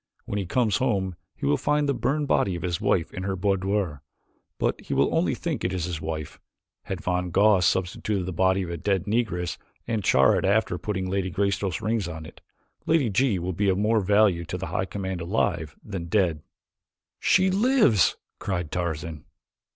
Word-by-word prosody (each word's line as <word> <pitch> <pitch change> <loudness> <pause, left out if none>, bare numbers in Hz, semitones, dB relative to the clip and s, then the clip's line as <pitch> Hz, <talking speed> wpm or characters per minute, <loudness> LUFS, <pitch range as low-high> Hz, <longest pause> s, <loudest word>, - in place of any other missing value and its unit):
When 105 - -2
he 95 - -3
comes 110 0 +2
home 95 -8 0 0.2
he - - -5
will 70 +1 +3
find 150 0 +1
the 140 - +2
burned 145 +2 -1
body 95 -8 +2
of 85 - -6
his 85 -2 -2
wife 85 -4 +1
in 95 - -5
her 95 0 -2
boudoir 95 -4 0 0.6
but - - -1
he - - -4
will - - +2
only - - +1
think - - -3
it 90 - 0
is 90 -3 -1
his 85 -3 -4
wife. 80 -2 -5 0.5
Had 95 -2 -4
von 90 -1 -1
Goss 95 -1 +4
substitute 95 +2 -1
the 95 +1 -4
body 95 +2 +2
of 85 - -5
a 85 - -3
dead 95 +2 0
Negress 100 -5 -1 0.3
and 110 -3 -1
char - - +5
it - - -4
after 100 -2 +1
putting 95 -3 -3
Lady 95 0 -1
Greystoke's 95 -1 -1
rings 110 -3 0
on 80 -2 -7
it - - -13 0.5
Lady 150 -9 +3
G 115 0 +2
will 90 +1 -3
be 100 +3 +1
of 95 - +2
more 110 +2 +2
value 100 -3 +3
to - - -4
the - - -4
High 95 - 0
Command 95 -1 -4
alive 85 -4 -1
than 95 -5 -5
dead.'" 85 -4 +1 0.8
"She 185 0 +3
lives!" 200 - +3 0.2
cried 90 -5 -3
Tarzan. 80 -3 -3
95 Hz, 190 wpm, -25 LUFS, 85-105 Hz, 0.8 s, char